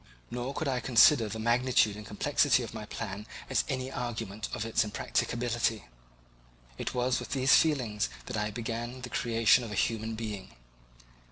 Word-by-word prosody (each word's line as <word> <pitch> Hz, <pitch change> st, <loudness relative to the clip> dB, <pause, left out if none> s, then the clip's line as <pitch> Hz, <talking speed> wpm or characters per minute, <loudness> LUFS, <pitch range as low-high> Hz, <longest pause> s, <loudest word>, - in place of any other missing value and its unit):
Nor 125 Hz, +3 st, -4 dB
could 160 Hz, -, -2 dB
I 130 Hz, -2 st, 0 dB
consider 120 Hz, -1 st, +5 dB
the 110 Hz, -, -5 dB
magnitude 115 Hz, -1 st, +2 dB
and 105 Hz, -, -8 dB
complexity 130 Hz, +5 st, +2 dB
of 115 Hz, -, -7 dB
my 110 Hz, -1 st, -7 dB
plan 105 Hz, -1 st, -6 dB, 0.2 s
as -, -, +3 dB
any 130 Hz, -1 st, -2 dB
argument 115 Hz, -5 st, -4 dB
of 105 Hz, -, -3 dB
its 115 Hz, -, +2 dB
impracticability. 115 Hz, +1 st, -1 dB, 0.9 s
It -, -, -3 dB
was 125 Hz, +1 st, +1 dB
with -, -, -6 dB
these 130 Hz, -1 st, +4 dB
feelings 120 Hz, -9 st, +2 dB, 0.2 s
that 125 Hz, -, -5 dB
I 105 Hz, 0 st, -1 dB
began 120 Hz, +3 st, -5 dB
the 125 Hz, -, -6 dB
creation 115 Hz, +1 st, +3 dB
of 115 Hz, -, -6 dB
a -, -, -4 dB
human 110 Hz, 0 st, -1 dB
being. 105 Hz, -3 st, -6 dB
115 Hz, 165 wpm, -30 LUFS, 110-125 Hz, 0.9 s, consider